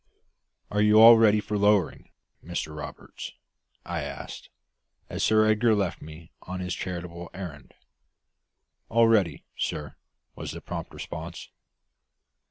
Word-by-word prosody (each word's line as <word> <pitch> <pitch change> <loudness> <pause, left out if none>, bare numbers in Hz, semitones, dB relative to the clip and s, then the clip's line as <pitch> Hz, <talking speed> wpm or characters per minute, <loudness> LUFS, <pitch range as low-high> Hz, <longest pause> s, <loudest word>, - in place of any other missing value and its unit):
"Are 105 - +1
you 105 +1 +6
all 115 +1 +11
ready 105 -1 +5
for 105 0 -3
lowering, 100 -3 +2 0.3
Mr 80 -2 -4
Roberts?" 75 - -8 0.5
I 85 -2 -3
asked, 70 -1 -7 0.6
as - - -2
Sir 110 0 +4
Edgar 110 +1 +3
left 100 -1 -1
me 80 +2 -11
on 90 +1 -6
his 90 -1 -3
charitable 85 -1 -6
errand. 80 -8 -8 1.1
"All 115 0 +5
ready, 95 -10 +2
sir," 75 -2 -4 0.4
was - - -6
the - - -8
prompt - - -6
response. 85 +2 -7
90 Hz, 125 wpm, -27 LUFS, 85-105 Hz, 1.1 s, all